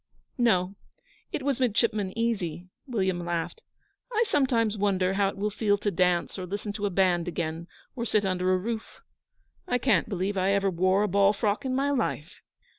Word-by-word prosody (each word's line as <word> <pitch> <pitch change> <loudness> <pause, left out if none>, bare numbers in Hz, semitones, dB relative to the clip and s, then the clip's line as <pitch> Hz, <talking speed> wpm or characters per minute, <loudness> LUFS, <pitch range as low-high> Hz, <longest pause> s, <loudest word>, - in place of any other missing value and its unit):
'No; 190 -6 +2 0.6
it 280 - -3
was 275 -2 0
Midshipman 215 -5 +1
Easy,' 185 -8 -1 0.2
William 190 -7 -1
laughed. 170 - -3 0.5
'I 455 0 +3
sometimes 240 - +1
wonder 190 -2 +1
how 195 0 +2
it - - -9
will 210 +2 -1
feel 205 -1 +1
to 205 0 -1
dance 180 +1 +1
or 180 - -5
listen 205 +2 -4
to 205 0 -2
a - - -1
band 180 -2 +2
again, 165 -1 -3 0.3
or 235 - -3
sit 215 -3 +1
under 185 -1 +1
a 185 - +3
roof. 220 +4 -5 0.7
I 245 - +2
can't 235 - +2
believe 195 0 -1
that 185 -1 0
I 195 - +3
ever 195 -1 +2
wore 185 +3 +2
a - - +1
ball 200 +1 +4
frock 210 +3 -1
in 255 -1 -1
my 280 +2 +1
life.' 210 - -2
200 Hz, 190 wpm, -27 LUFS, 185-225 Hz, 0.7 s, ball